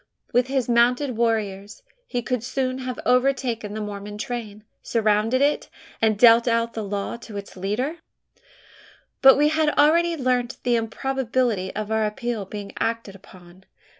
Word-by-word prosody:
With 245 +1 +3
his 265 -2 -1
mounted 245 +2 +2
warriors, 215 - -2 0.2
he 245 -2 -3
could 250 -2 -2
soon 255 +1 -2
have 255 -1 -5
overtaken 250 -4 +1
the 215 - -4
Mormon 205 0 -6
train, 215 -2 -6 0.2
surrounded 225 +3 +1
it, 290 +1 0 0.3
and 220 -2 +3
dealt 235 +1 +6
out 230 0 +1
the 220 - -4
law 200 +2 -4
to 225 -3 -9
its 200 - -8
leader? 215 - -2 1.2
But 270 0 +8
we 295 +1 +4
had 310 0 +2
already 335 +3 +4
learnt 250 -2 0
the 245 -1 +2
improbability 235 -3 -1
of 215 0 -4
our 220 -1 +2
appeal 230 -1 -4
being 200 +1 -7
acted 230 -3 -2
upon. 185 -1 -17
235 Hz, 150 wpm, -23 LUFS, 210-255 Hz, 1.2 s, But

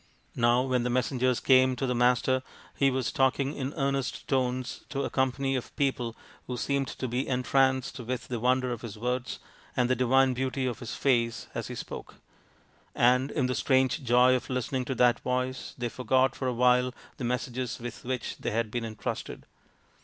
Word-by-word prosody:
Now 120 +1 +3
when 130 -2 +1
the 125 - -1
messengers 125 0 +1
came 130 -1 +5
to 135 - -2
the 125 - 0
Master 125 +1 +3 0.3
he 140 - +3
was 130 -3 -1
talking 135 -1 +1
in 135 -2 -3
earnest 135 -3 -1
tones 130 -2 -1
to 140 -1 -2
a - - -3
company 135 +1 0
of 125 - -5
people 125 -5 -1 0.3
who 125 - -3
seemed 140 +2 0
to 130 - -4
be 125 +3 -2
entranced 130 0 +1
with 125 +1 -4
the 120 -2 -3
wonder 125 +1 +2
of 120 -2 -4
his 115 -3 -7
words 125 +2 -2 0.4
and 125 0 +2
the - - +4
divine 130 +1 +3
beauty 130 +1 -1
of 125 -2 -2
his 120 - -6
face 115 -4 +1
as - - -4
he - - -6
spoke; - - -7 0.8
and 125 +3 +4
in 140 -4 0
the 125 - 0
strange 130 +3 +2
joy 125 +1 +5
of 130 - -1
listening 125 0 -1
to 135 - -2
that 120 0 +4
voice 125 0 -2
they 120 -1 -2
forgot 130 +3 +1
for 130 - -3
a 125 - 0
while 125 +1 +3 0.2
the - - -6
messages 125 0 -2
with 120 0 -7
which 125 -1 -3
they - - -2
had 115 -1 -1
been 120 0 -2
entrusted. 110 -1 -5
125 Hz, 190 wpm, -28 LUFS, 125-130 Hz, 0.8 s, came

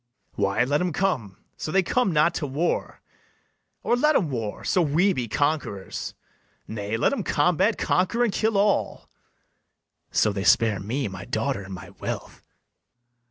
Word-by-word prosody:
BARABAS. - - -5
Why, 100 +4 +2
let 145 +5 +1
'em 180 -2 -1
come, 135 - -1 0.2
so 155 - -4
they 190 +2 +3
come 245 +2 +1
not 155 +2 +3
to 150 - -3
war; 150 +6 -2 0.8
Or 240 - +2
let 300 +5 +3
'em 160 -8 +2
war, 115 -5 -4
so 185 - +2
we 170 +6 +3
be 125 -7 -3
conquerors. 145 -8 -2 0.5
Nay, 105 0 -3
let 120 - +2
'em 275 - -1
combat, 180 +6 +2
conquer, 210 +7 +1
and 225 -5 +1
kill 220 -1 +1
all, 205 +1 +1 1.0
So 105 - +2
they 95 -1 -3
spare 110 -1 +4
me, 115 +7 -2
my 95 0 -8
daughter, 130 -2 -1
and 95 0 -7
my 85 - -10
wealth. - - -6
145 Hz, 160 wpm, -25 LUFS, -, 1.0 s, spare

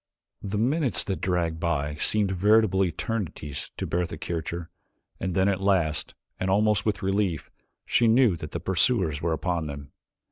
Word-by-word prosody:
The 100 +1 -3
minutes 135 +4 +1
that 95 - -3
dragged 85 -3 0
by 75 -3 -1
seemed 100 +6 +2
veritable 100 0 +3
eternities 90 -5 -4
to - - -3
Bertha 85 0 -2
Kircher 85 0 -4 0.5
and 95 -2 -3
then 95 0 +3
at 100 -1 0
last, 90 -6 +1 0.2
and 95 - -1
almost 105 +2 +2
with 105 -1 -1
relief, 95 -4 -1 0.3
she 120 - +3
knew 115 -4 +4
that 75 -1 -7
the 85 - -4
pursuers 90 - +1
were 85 - 0
upon 85 -1 -2
them. 70 -1 -8
95 Hz, 155 wpm, -26 LUFS, 85-105 Hz, 0.5 s, knew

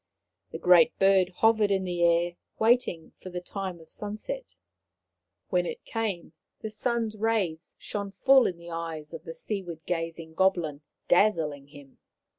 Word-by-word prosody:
The - - -6
Great 180 -2 +5
Bird 195 -2 +4
hovered 215 +2 +3
in 195 -1 +1
the 175 -1 -3
air, 170 0 +3 0.2
waiting 220 -8 +2
for 185 - -8
the 180 0 -4
time 185 -1 -5
of 160 -1 -17
sunset. 215 - -6 0.9
When - - +1
it 475 -1 -7
came 205 -8 -3 0.3
the 220 - -5
sun's 225 0 -1
rays 205 -7 -1
shone 200 -1 -5
full 265 +6 +5
in 175 - -4
the 170 0 -11
eyes 165 -2 -5
of 165 0 -8
the 165 - -7
seaward 175 -4 -5
gazing 165 -1 -4
goblin, 170 -5 +1 0.3
dazzling 160 -8 +2
him. 145 -2 -15
180 Hz, 150 wpm, -28 LUFS, 165-215 Hz, 0.9 s, Great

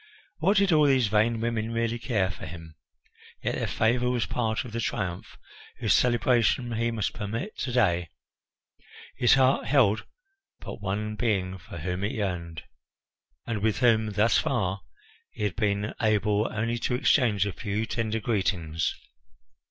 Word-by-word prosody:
What 190 +6 +3
did 195 -1 +4
all 150 -2 +5
these 130 -5 +3
vain 110 +2 +2
women 115 -1 -1
really 115 0 -1
care 100 -7 0
for 85 - -9
him? 80 0 -10 0.7
Yet - - 0
their - - -2
favour 120 +2 +1
was 125 -2 0
part 120 0 -1
of 120 - -8
the 115 - -3
triumph 90 -5 -3 0.4
whose - - +2
celebration 120 0 +2
he 115 +1 0
must 110 -3 -2
permit 115 - -4
to 130 - -2
day. 90 -9 +2 1.1
His 120 +2 +5
heart 130 0 +3
held 110 -6 +3 0.5
but - - -8
one 105 +2 -3
being 95 -5 -1
for 85 -1 -10
whom 90 +4 -3
it 100 - -1
yearned, 90 -6 -4 0.8
and 115 -3 -3
with 110 0 +1
whom 110 -3 +3
thus 105 +2 +3
far 100 -6 -1 0.5
he - - -7
had 105 -4 -1
been 105 0 -1
able 105 0 +2
only 115 +2 -1
to 125 - -1
exchange 125 -6 +3
a 100 - -3
few 105 +2 -2
tender 115 -1 -2
greetings. 95 -8 -1
110 Hz, 155 wpm, -27 LUFS, 100-120 Hz, 1.1 s, all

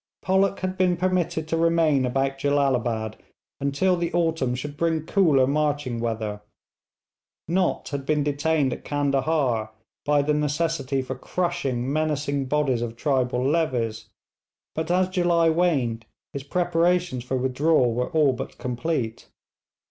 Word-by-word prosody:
Pollock 190 +1 +2
had 185 0 -3
been 180 -2 +3
permitted 175 -3 0
to 165 - +1
remain 165 -5 +3
about 135 +2 -1
Jellalabad 125 -6 0 0.4
until 140 +7 +1
the 170 -1 -2
autumn 160 -7 +1
should 145 +3 -6
bring 160 0 0
cooler 160 -8 +4
marching 145 -3 0
weather. 110 -3 -3 1.1
Nott 180 +2 0
had 140 -1 -4
been 150 +1 +1
detained 145 -1 +1
at - - -8
Candahar 140 -5 0 0.3
by 145 -1 +2
the 150 +1 +1
necessity 150 -2 -1
for 130 - -4
crushing 135 -4 -2
menacing 145 -2 -1
bodies 135 -3 +1
of 115 -1 -4
tribal 125 -1 0
levies, 125 -8 -1 0.6
but 160 +1 -3
as 180 +1 +3
July 175 -3 +2
waned 135 -10 0 0.3
his 140 - -4
preparations 175 -2 0
for 130 +1 -2
withdrawal 130 0 +2
were 125 +2 -1
all 155 -5 +3
but 130 +1 -7
complete. 125 -2 -3
145 Hz, 135 wpm, -24 LUFS, 130-165 Hz, 1.1 s, cooler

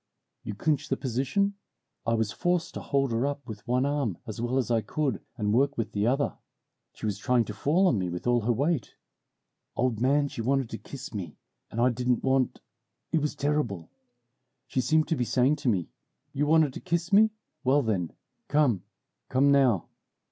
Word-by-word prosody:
"You 105 - -6
clinch 150 +6 0
the 135 - +1
position? 135 - 0 0.5
I 115 - +3
was 110 -2 0
forced 175 +4 0
to - - -5
hold 135 -2 0
her 115 +4 +1
up 140 -2 -4
with 110 -1 -9
one 125 +2 +2
arm 140 - -1
as 110 0 -6
well 120 +2 0
as 125 -2 0
I 115 -1 +3
could, 140 -3 -2 0.2
and 105 -2 0
work 140 +4 +2
with 110 -2 -2
the 105 +1 0
other. 135 +3 0 0.6
She - - -7
was 105 -2 -1
trying 120 +2 +2
to 105 - -6
fall 160 - +2
on 125 - +3
me 90 -1 -1
with 90 0 -5
all 120 -1 +3
her 115 +3 +1
weight. 140 +4 0 0.8
Old 120 -3 0
man, 140 +3 +3
she 120 - -5
wanted 135 0 0
to - - -5
kiss 140 -2 -9
me, 90 -7 -6 0.3
and 115 - -5
I 125 +2 +4
didn't 125 +1 0
want 130 -1 +1 0.5
it 160 - +2
was 150 0 -1
terrible. 140 - -1 0.7
She 130 +1 -1
seemed 155 +5 +2
to 165 - +2
be 125 - 0
saying 130 +5 +2
to 145 -3 0
me, 95 -7 0 0.4
'You 145 +2 0
wanted 155 -3 +4
to - - -6
kiss 170 +1 -2
me, 215 +2 +7 0.3
well 140 +3 +3
then, 95 -7 -1 0.4
come, 140 - +2 0.5
come 140 +2 +4
now!' 130 - +3
130 Hz, 195 wpm, -28 LUFS, 115-145 Hz, 0.8 s, me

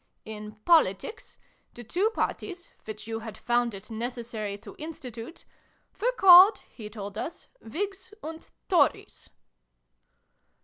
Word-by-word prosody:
In 215 -1 -8
Politics, 325 - +2 0.4
the 240 - -9
two 365 - +1
Parties, 365 -5 -4
which 215 0 -7
you 225 0 -4
had 220 -1 -8
found 240 -2 0
it 195 +4 -11
necessary 225 -3 -4
to - - -12
institute, 265 -3 -8 0.6
were - - +3
called, 385 -1 +9
he 215 -3 -10
told 205 -2 -7
us, 330 - -6
' - - -35
Whigs 390 - -5
' - - -45
and 320 +1 -8
' - - -50
Tories 335 -8 +1
240 Hz, 135 wpm, -28 LUFS, 215-350 Hz, 0.6 s, called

